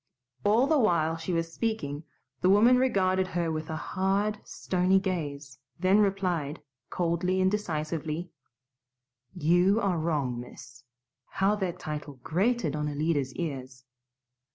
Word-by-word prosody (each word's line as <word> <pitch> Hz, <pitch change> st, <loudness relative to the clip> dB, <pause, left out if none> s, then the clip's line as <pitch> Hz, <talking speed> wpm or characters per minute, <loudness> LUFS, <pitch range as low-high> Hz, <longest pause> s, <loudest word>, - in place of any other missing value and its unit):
All 220 Hz, +5 st, +4 dB
the 300 Hz, +1 st, +3 dB
while 165 Hz, -8 st, +2 dB
she 165 Hz, +3 st, -4 dB
was 165 Hz, -1 st, -1 dB
speaking 160 Hz, -10 st, -3 dB, 0.4 s
the 185 Hz, -, +3 dB
woman 225 Hz, +6 st, +6 dB
regarded 190 Hz, -7 st, +2 dB
her 170 Hz, -2 st, -1 dB
with 155 Hz, 0 st, -4 dB
a 160 Hz, -, -3 dB
hard, 195 Hz, +5 st, -1 dB
stony 185 Hz, +1 st, +1 dB
gaze; 145 Hz, -8 st, -4 dB, 0.2 s
then 190 Hz, +3 st, +4 dB
replied, 180 Hz, -7 st, 0 dB, 0.3 s
coldly 180 Hz, +1 st, 0 dB
and 185 Hz, 0 st, +3 dB
decisively, 160 Hz, -3 st, -3 dB, 1.0 s
"You 175 Hz, +5 st, +3 dB
are 190 Hz, -6 st, 0 dB
wrong, 145 Hz, -7 st, -1 dB
miss" 125 Hz, +1 st, -12 dB, 0.4 s
how 195 Hz, +2 st, +1 dB
that 180 Hz, -3 st, -2 dB
title 150 Hz, -3 st, -6 dB
grated 185 Hz, -, 0 dB
on 150 Hz, 0 st, -1 dB
Alida's 145 Hz, -3 st, -1 dB
ears! 130 Hz, -6 st, -5 dB
175 Hz, 130 wpm, -28 LUFS, 150-195 Hz, 1.0 s, woman